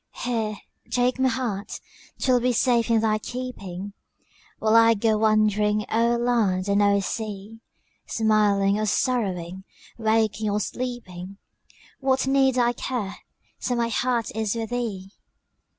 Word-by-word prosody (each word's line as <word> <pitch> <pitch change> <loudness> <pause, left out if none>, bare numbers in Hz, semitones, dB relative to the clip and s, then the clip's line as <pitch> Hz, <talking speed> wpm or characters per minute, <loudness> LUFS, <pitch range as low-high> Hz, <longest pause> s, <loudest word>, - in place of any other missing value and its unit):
Here, 225 -3 -1 0.3
take 250 +1 +1
my 260 0 +3
heart 225 -5 -3 0.4
'twill 255 -2 +2
be 250 +1 +1
safe 235 -1 +2
in 225 -1 +3
thy 215 -1 +1
keeping, 205 -6 -6 0.6
While 220 0 +2
I 230 0 +6
go 220 +1 +2
wandering 215 -1 +2
o'er 235 +1 +3
land 220 -6 +1
and 200 0 +2
o'er 200 0 +3
sea; 215 +1 -5 0.5
Smiling 210 -2 +2
or 215 - 0
sorrowing, 190 -7 -1 0.4
waking 220 -1 +1
or 205 +1 0
sleeping, 195 -5 -5 0.6
What 265 -1 +1
need 265 -1 +3
I 240 -1 +3
care, 235 -6 -4 0.4
so 250 - -1
my 235 -1 0
heart 235 -2 -1
is 220 -1 -1
with 225 -1 -4
thee? 210 -6 -3
220 Hz, 135 wpm, -24 LUFS, 205-245 Hz, 0.6 s, I